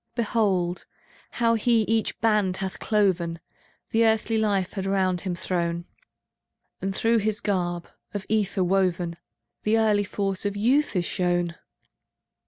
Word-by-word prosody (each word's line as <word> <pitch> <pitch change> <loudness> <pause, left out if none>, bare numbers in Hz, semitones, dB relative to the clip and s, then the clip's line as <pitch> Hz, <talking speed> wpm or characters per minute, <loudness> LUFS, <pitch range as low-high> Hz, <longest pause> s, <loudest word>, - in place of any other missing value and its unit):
Behold, 200 -7 0 0.4
how 230 -1 +2
he 230 0 +3
each 225 +1 0
band 210 -4 +2
hath 190 -1 -4
cloven, 185 -6 +1 0.5
The 225 +1 +3
earthly 220 0 +2
life 200 -4 0
had 195 -2 -3
round 185 -2 +1
him 185 -3 -3
thrown. 170 -1 -2 1.0
And 195 0 -2
through 230 +2 +3
his 215 0 -1
garb, 175 -4 -1 0.2
of 205 -3 -5
ether 205 -3 +1
woven, 180 -2 +1 0.4
("The 215 +1 +2
early 210 -2 +3
force 195 -1 -2
of 205 0 -2
youth 260 +7 +2
is 175 -2 +1
shown! 175 -1 0
195 Hz, 135 wpm, -25 LUFS, 180-220 Hz, 1.0 s, he